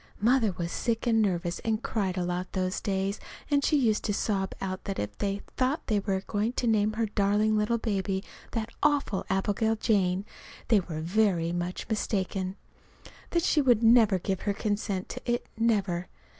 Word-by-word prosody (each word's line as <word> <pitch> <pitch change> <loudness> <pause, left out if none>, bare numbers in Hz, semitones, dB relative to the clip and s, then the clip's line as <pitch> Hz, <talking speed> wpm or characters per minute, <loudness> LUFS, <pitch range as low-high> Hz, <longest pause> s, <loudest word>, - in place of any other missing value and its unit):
Mother 230 -1 +3
was 170 -1 -4
sick 230 -1 -1
and 225 -2 +3
nervous, 175 -4 0
and 220 0 -1
cried 195 -4 -1
a 180 - 0
lot 180 +1 -3
those 185 -1 -1
days, 195 0 -1 0.3
and 285 -1 +3
she 300 - +3
used 225 -6 +2
to 205 - 0
sob 195 -3 -1
out 185 -1 -4
that 195 - -3
if 105 0 -3
they 200 0 -1
thought 260 +4 0
they 210 -2 +1
were 195 -1 -1
going 215 +3 -1
to 250 - -1
name 215 -2 +2
her 225 +1 0
darling 210 +1 +2
little 215 +2 +2
baby 195 -3 -1 0.3
that 225 -1 -2
awful 285 -9 +1
Abigail 205 +3 +1
Jane, 195 -4 +1 0.4
they 220 -3 +6
were 165 -4 -5
very 175 -1 +2
much 175 +1 -3
mistaken; 195 -3 -1 0.7
that 340 -1 +1
she 305 - +3
would 240 -4 +3
never 225 -4 +6
give 190 +1 -2
her 205 - 0
consent 205 -2 -2
to 255 - -6
it 240 - -1
never. 200 -6 +1
205 Hz, 180 wpm, -28 LUFS, 190-225 Hz, 0.7 s, they